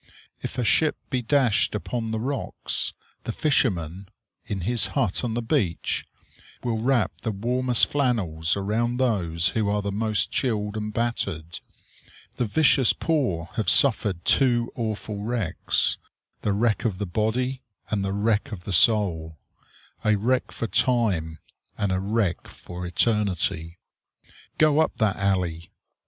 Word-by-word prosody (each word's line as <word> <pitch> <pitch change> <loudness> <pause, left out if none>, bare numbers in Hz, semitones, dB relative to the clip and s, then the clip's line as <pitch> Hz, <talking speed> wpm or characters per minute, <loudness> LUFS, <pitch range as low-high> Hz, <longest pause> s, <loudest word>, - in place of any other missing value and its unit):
If - - -6
a 125 - 0
ship 155 +6 +3
be 130 - 0
dashed 120 -4 +2
upon 115 +2 -3
the 110 0 -2
rocks, 135 +4 -3 0.3
the - - -3
fisherman, 95 - 0 0.4
in 100 -2 -4
his 115 +5 +2
hut 120 -7 +1
on 115 -2 -2
the 120 - -2
beach, 90 -6 -1 0.6
will 115 -2 -1
wrap 120 0 +2
the 115 - -2
warmest 120 +4 +2
flannels 100 - 0
around 115 +5 -1
those 90 -10 +1
who 110 -2 0
are 105 0 0
the 100 - -2
most 105 -2 0
chilled 105 -5 -1
and 105 0 -3
battered. 100 -8 -2 0.8
The 120 - 0
vicious 130 +1 +4
poor 125 - -1
have 110 - +1
suffered 105 - +3
two 120 -3 +3
awful 110 -2 -4
wrecks, 110 -5 0 0.4
the 105 - 0
wreck 110 +3 +1
of 110 -6 -1
the 105 - -2
body, 120 +7 -1 0.3
and 105 -2 0
the 95 - -1
wreck 105 +5 0
of 95 -5 -7
the 100 - -4
soul; 85 -6 +3 0.7
a 110 -1 +3
wreck 125 +5 0
for - - -4
time 105 -11 +1 0.4
and 100 -2 0
a 95 - +1
wreck 100 -2 -1
for 90 0 -8
eternity. 90 -4 0 0.8
Go 155 -1 +4
up 160 - +1
that 110 -4 +1
alley! 90 -4 -1
110 Hz, 145 wpm, -25 LUFS, 95-120 Hz, 0.8 s, vicious